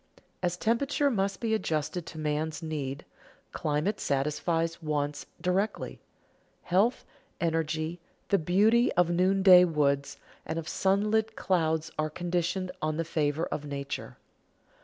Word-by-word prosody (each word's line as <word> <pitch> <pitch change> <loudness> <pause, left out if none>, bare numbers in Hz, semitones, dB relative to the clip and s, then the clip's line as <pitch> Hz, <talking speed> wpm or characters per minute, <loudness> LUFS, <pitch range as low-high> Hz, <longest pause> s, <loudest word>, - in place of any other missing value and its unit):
As 175 -1 -1
temperature 275 +7 +1
must 195 -3 -1
be 225 -2 0
adjusted 160 -4 -1
to - - -9
man's 155 +1 -2
need, 145 -4 -4 0.5
climate 150 +7 -1
satisfies 165 +4 -1
wants 150 -2 -2
directly. 185 +4 -1 0.6
Health, 200 +8 +2 0.3
energy, 160 0 -1 0.3
the 200 - +4
beauty 210 +9 +3
of 175 -1 +3
noonday 185 +1 +6
woods 140 -4 +1 0.3
and 165 - -4
of 165 -1 -4
sunlit 215 +3 +1
clouds 160 -3 0
are 155 0 +1
conditioned 175 +3 -2
on 155 0 -1
the 165 - -1
favor 155 0 0
of 145 - -4
nature. 140 -1 -5
165 Hz, 120 wpm, -29 LUFS, 155-190 Hz, 0.6 s, noonday